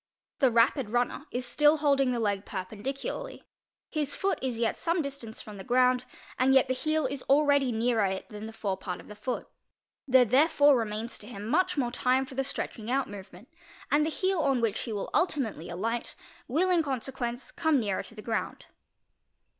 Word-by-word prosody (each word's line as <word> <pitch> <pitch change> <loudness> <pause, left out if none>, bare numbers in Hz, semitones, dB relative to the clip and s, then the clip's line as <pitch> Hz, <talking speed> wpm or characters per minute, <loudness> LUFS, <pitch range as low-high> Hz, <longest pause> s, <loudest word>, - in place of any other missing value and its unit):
The 265 - +5
rapi 235 0 +2
runner 245 +5 -1
is 250 +1 -3
still 295 +5 +4
holding 280 -3 +3
the 240 - -1
le 205 -3 0
perpendicularly. 220 - -5 0.5
His 300 -3 -1
foot 390 0 0
is 255 -3 -2
ye 230 0 +2
some 335 +1 -1
distance 275 -6 -5
from 210 -1 -10
the 190 - -8
groun 250 +2 +3 0.4
and 265 +1 +4
yet 265 0 +5
the 255 - +1
heel 310 +3 0
is 270 0 -3
already 285 -2 +4
ne: 235 +2 +1 0.2
it - - -9
than 210 +1 -7
the - - -7
forepart 190 -4 -4
of - - -13
the 210 - -9
foo 225 +4 -3 0.6
There 260 -1 +6
therefore 285 +3 +5
remains 225 0 -3
to 240 - -9
much 310 - +1
more 245 -4 0
time 255 +2 +2
for 265 - -11
the 270 +1 0
stretel 255 -3 -4
ing 220 - -6
out 270 +1 0
movement, 195 +2 -11 0.4
and 295 +1 +4
the 310 - 0
he 375 +4 0
on 275 -7 +1
which 230 -3 0
he 235 - -5
will 205 -2 -4
ultimately 265 - 0
aligl 225 +7 -3 0.3
will 340 +9 +2
in 350 -2 +4
consequence 260 -3 -4
come 310 -6 +2
yet 200 -3 -1
nea' - - -3
to 225 - -14
the 210 - -9
ground. 225 -2 -3
255 Hz, 195 wpm, -29 LUFS, 220-285 Hz, 0.6 s, There